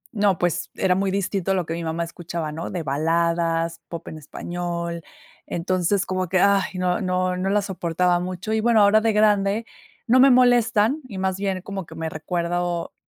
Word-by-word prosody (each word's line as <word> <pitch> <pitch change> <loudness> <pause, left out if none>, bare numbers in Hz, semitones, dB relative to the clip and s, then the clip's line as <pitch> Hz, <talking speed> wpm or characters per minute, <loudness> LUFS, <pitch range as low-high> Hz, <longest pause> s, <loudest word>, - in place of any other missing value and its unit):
no, 200 -4 +2
pues, 175 0 -1
era 185 -1 +2
muy 195 0 0
distinto 195 -1 -1
a - - +3
lo 180 -3 -1
que 165 - -4
mi 170 0 -4
mamá 165 +1 -2
escuchaba, 170 -2 -5
¿no?, 160 +2 -5
de 175 -3 -4
baladas, 165 +3 0
pop 170 -1 -8
en 160 - -8
español. 170 +2 -5 0.4
Entonces 185 +3 0
como 185 -2 -2
que 185 - +2
ay, 200 +1 +4
no 180 +1 0
no 185 0 0
no 185 +2 -1
la 205 +1 +2
soportaba 180 -2 0
mucho. 185 +4 -4
Y 220 - +1
bueno, 230 -2 +4
ahora 210 +2 +5
de 225 0 +2
grande 210 +1 +2 0.4
no 255 +2 +5
me 275 - +7
molestan 245 +1 +4
y 195 - -7
más 190 0 0
bien 195 -2 -2
como 195 -2 -6
que 160 - -12
me 160 0 -3
recuerdo 175 +1 -2
180 Hz, 195 wpm, -23 LUFS, 170-200 Hz, 0.4 s, me